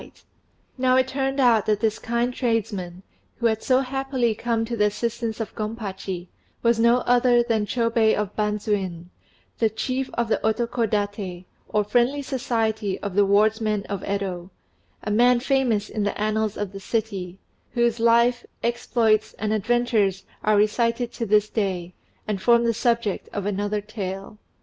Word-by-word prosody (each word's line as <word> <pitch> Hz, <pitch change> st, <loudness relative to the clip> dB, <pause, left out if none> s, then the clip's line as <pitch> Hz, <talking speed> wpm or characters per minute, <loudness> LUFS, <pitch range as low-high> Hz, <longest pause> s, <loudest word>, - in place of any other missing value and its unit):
] -, -, -41 dB, 0.3 s
Now 255 Hz, 0 st, +3 dB
it 260 Hz, 0 st, +3 dB
turned 270 Hz, +1 st, -2 dB
out 235 Hz, -5 st, +4 dB
that 210 Hz, -1 st, +2 dB
this 220 Hz, -2 st, 0 dB
kind 235 Hz, +2 st, -1 dB
tradesman, 200 Hz, -7 st, -2 dB, 0.3 s
who 235 Hz, -, -4 dB
had 220 Hz, -1 st, +2 dB
so 260 Hz, 0 st, +3 dB
happily 265 Hz, -3 st, -1 dB
come 225 Hz, +1 st, -1 dB
to 235 Hz, +1 st, -3 dB
the 210 Hz, -2 st, +3 dB
assistance 230 Hz, +2 st, -2 dB
of 225 Hz, -, -4 dB
Gompachi, 200 Hz, -5 st, -5 dB, 0.4 s
was 235 Hz, -1 st, +3 dB
no 235 Hz, +2 st, +4 dB
other 245 Hz, 0 st, +4 dB
than 220 Hz, -3 st, 0 dB
Chôbei 230 Hz, -2 st, +2 dB
of 210 Hz, -1 st, -3 dB
Bandzuin, 200 Hz, -5 st, -2 dB, 0.5 s
the 225 Hz, -, +3 dB
chief 255 Hz, +4 st, -2 dB
of 235 Hz, -1 st, 0 dB
the 220 Hz, -, +1 dB
Otokodaté, 210 Hz, -5 st, -1 dB, 0.2 s
or 210 Hz, -, +1 dB
Friendly 245 Hz, +6 st, +1 dB
Society 225 Hz, -6 st, -1 dB
of 200 Hz, -2 st, -4 dB
the 200 Hz, +1 st, +3 dB
wardsmen 215 Hz, 0 st, +2 dB
of 200 Hz, -1 st, -3 dB
Yedo 190 Hz, -3 st, -3 dB, 0.5 s
a 210 Hz, -, -2 dB
man 240 Hz, +3 st, +4 dB
famous 245 Hz, -5 st, +1 dB
in 215 Hz, -, -4 dB
the 205 Hz, 0 st, -1 dB
annals 215 Hz, 0 st, 0 dB
of 205 Hz, -2 st, -3 dB
the 195 Hz, -, -8 dB
city, 195 Hz, -4 st, -3 dB, 0.4 s
whose 235 Hz, -1 st, +1 dB
life, 235 Hz, +1 st, +4 dB, 0.2 s
exploits, 230 Hz, -2 st, +1 dB
and 215 Hz, 0 st, -1 dB
adventures 215 Hz, -3 st, +1 dB, 0.2 s
are 210 Hz, -1 st, +3 dB
recited 230 Hz, +3 st, +1 dB
to 230 Hz, -, -3 dB
this 210 Hz, +1 st, +4 dB
day, 185 Hz, -5 st, -2 dB, 0.3 s
and 205 Hz, -3 st, -2 dB
form 235 Hz, +1 st, +4 dB
the 230 Hz, -1 st, +2 dB
subject 230 Hz, -3 st, 0 dB
of 200 Hz, -2 st, -3 dB
another 205 Hz, +1 st, -1 dB
tale. 200 Hz, -1 st, -6 dB
220 Hz, 160 wpm, -24 LUFS, 205-235 Hz, 0.5 s, out